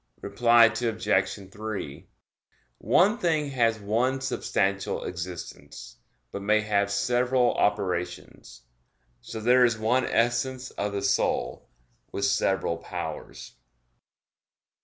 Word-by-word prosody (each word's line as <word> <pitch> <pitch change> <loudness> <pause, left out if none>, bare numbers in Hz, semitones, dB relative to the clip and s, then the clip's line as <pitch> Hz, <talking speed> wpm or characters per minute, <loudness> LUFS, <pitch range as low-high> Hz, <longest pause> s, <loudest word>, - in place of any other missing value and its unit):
Reply 115 +3 +5
Obj. 110 -4 -1
3: 100 -9 -6 0.7
One 210 +6 +3
thing 155 -4 0
has 115 -4 +2
one 120 +6 0
substantial 100 -6 -1
existence, 85 -8 -8 0.3
but 100 - -6
may 105 +2 +2
have 100 -1 0
several 125 +4 +2
operations. 90 -9 -3 0.6
So 110 - -7
there 125 +3 +4
is 120 -2 +3
one 120 +4 +1
essence 125 +2 0
of 100 0 -3
the 100 -1 -3
soul, 100 -10 -1 0.4
with 100 - -1
several 95 -3 0
powers. - - -7
110 Hz, 100 wpm, -26 LUFS, 100-125 Hz, 0.7 s, Reply